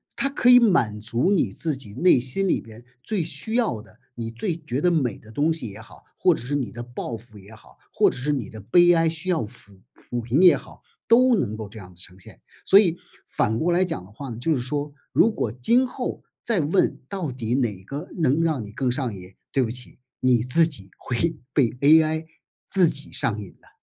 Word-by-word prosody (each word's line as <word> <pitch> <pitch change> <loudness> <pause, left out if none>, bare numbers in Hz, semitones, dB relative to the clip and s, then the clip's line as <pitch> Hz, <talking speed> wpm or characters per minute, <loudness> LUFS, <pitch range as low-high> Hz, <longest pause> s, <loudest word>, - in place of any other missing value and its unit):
它 275 - 0
可 260 -3 +2
以 245 - +9
满 145 - +2
足 120 - 0
你 195 - +2
自 155 -4 -2
己 105 -6 -8
内 175 - +4
心 135 +11 -1
里 - - +2
边 115 +1 -13 0.2
最 205 -6 -1
需 160 +7 -5
要 230 - 0
的， 110 +2 -20 0.2
你 115 -1 -5
最 160 - -3
觉 150 -5 -4
得 180 - +3
美 140 - 0
的 110 - -16
东 150 +7 +1
西 140 -8 -3
也 100 +2 -11
好， 115 - -15
或 180 - +4
者 135 - -6
是 145 +3 -2
你 135 -4 -2
的 120 - -7
抱 120 0 -6
负 110 -1 -13
也 100 +3 -14
好， 110 - -18 0.2
或 - - +4
者 - - -6
是 135 +5 -1
你 125 -7 -3
的 110 - -10
悲 175 - +5
哀 165 -1 +3
需 165 +3 -3
要 170 -8 +1
抚 100 -2 -9
抚 120 - -6
平 120 +8 +1
也 180 -2 +7
好， - - -14 0.3
都 250 +1 +5
能 110 - -1
够 110 -2 -7
这 110 - -13
样 90 -3 -11
子 90 - -16
呈 90 0 -12
现。 95 - -14 0.2
所 195 - +7
以 175 -5 +2 0.3
反 110 +2 0
过 175 +2 +1
来 180 +2 +3
讲 160 - -4
的 95 - -16
话 135 +5 -8
呢， 115 - -6
就 155 +6 0
是 125 - -2
说， 145 +3 -3 0.2
如 230 - +4
果 120 - -2
今 235 - +3
后 - - -5 0.2
再 230 -5 0
问 165 +5 +1
到 185 -8 -4
底 120 -2 -3
哪 110 -8 -1
个 140 - -7
能 155 -2 +2
让 155 -9 -1
你 105 - -11
更 125 +3 -1
上 125 -3 -2
瘾， 90 0 -12 0.2
对 135 - +1
不 115 - 0
起， 125 +2 -5 0.2
你 125 -2 +4
自 125 +8 +3
己 115 -12 -6
会 160 +7 -1 0.2
被 130 -5 +3
AI 155 +5 +3 0.4
自 185 -4 +4
己 145 -1 0
上 110 -1 -1
瘾 100 -4 -10
的。 - - -23
135 Hz, 250 characters per minute, -24 LUFS, 115-170 Hz, 0.4 s, 以